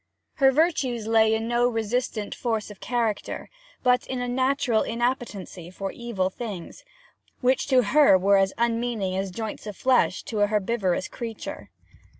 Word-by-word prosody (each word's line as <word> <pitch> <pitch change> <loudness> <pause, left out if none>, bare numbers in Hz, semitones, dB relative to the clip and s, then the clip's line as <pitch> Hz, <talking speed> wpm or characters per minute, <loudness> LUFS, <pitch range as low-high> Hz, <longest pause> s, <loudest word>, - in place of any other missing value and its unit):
Her 270 -2 +5
virtues 265 -7 +1
lay 220 0 +4
in 225 +1 -2
no 240 +1 +2
resistant 225 -2 -2
force 220 -3 -2
of 205 - -13
character, 230 -4 -2 0.3
but 250 -1 +3
in 260 - -3
a 245 - -2
natural 255 -2 +1
inappetency 230 -7 -3
for 195 +1 -5
evil 205 -6 -2
things, 200 -6 -7 0.6
which 255 +1 +2
to 260 -3 +4
her 270 -1 +5
were 200 +2 +4
as 195 0 +3
unmeaning 230 -4 0
as 195 0 -2
joints 215 +3 -6
of 210 - -7
flesh 260 -1 +2
to 220 - -4
a 205 - +4
herbivorous 205 -3 0
creature. 230 -2 -7
230 Hz, 155 wpm, -25 LUFS, 205-245 Hz, 0.6 s, Her